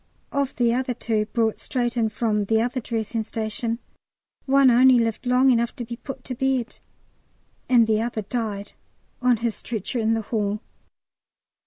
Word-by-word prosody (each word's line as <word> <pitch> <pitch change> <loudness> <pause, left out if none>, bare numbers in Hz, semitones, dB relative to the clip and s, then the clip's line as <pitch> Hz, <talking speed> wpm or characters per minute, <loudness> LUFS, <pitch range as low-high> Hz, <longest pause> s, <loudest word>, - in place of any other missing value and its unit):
Of 280 -1 -1
the 235 -1 +2
other 250 0 -1
two, 220 -3 -1
brought 225 -1 0
straight 240 -2 -2
in 225 -2 +1
from 210 -1 0
the 220 +2 +2
other 245 +3 0
dressing 225 -1 -3
station, 225 +1 -3 0.7
one 270 -1 +6
only 255 +1 +6
lived 230 +1 -1
long 255 +2 +5
enough 235 -1 +1
to 240 - -5
be 235 +1 -6
put 265 +1 -8
to 255 - -5
bed, 260 -1 -1 0.9
and 240 -3 +6
the 220 -1 +1
other 225 -2 -2
died 205 -2 -4 0.5
on 250 -2 +4
his 230 - +1
stretcher 235 +3 -4
in 225 0 +2
the 225 - -1
hall. 210 -1 -1
235 Hz, 165 wpm, -24 LUFS, 220-250 Hz, 0.9 s, one